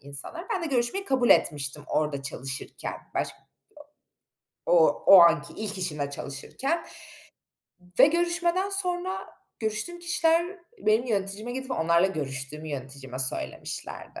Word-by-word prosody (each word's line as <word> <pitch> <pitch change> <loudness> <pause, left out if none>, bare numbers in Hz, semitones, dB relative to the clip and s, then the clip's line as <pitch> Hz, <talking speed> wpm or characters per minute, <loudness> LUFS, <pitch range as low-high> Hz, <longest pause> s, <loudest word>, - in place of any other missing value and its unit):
insanlar. 140 - -6
Ben 365 - -1
de - - -1
görüşmeyi 265 +8 -1
kabul 260 -8 +1
etmiştim 145 0 +2
orada 150 -3 -1
çalışırken 135 0 -5 0.2
başk - - -2 1.3
o - - +2 0.3
o 195 - +10
anki 170 -3 +3
ilk 210 -2 -4
işimde 150 -6 -2
çalışırken 255 - -4 1.1
ve - - +9
görüşmeden 345 +3 0
sonra 375 -1 +5 0.4
görüştüğüm 220 +11 -2
kişiler 345 +1 +1 0.2
benim 220 - +2
yöneticime 205 +1 -3
gidip 265 +1 -6
onlarla 170 -5 +2
görüştüğümü 150 -2 -5
yöneticime 135 -2 -7
söylemişlerdi. 130 0 -3
215 Hz, 115 wpm, -26 LUFS, -, 1.3 s, o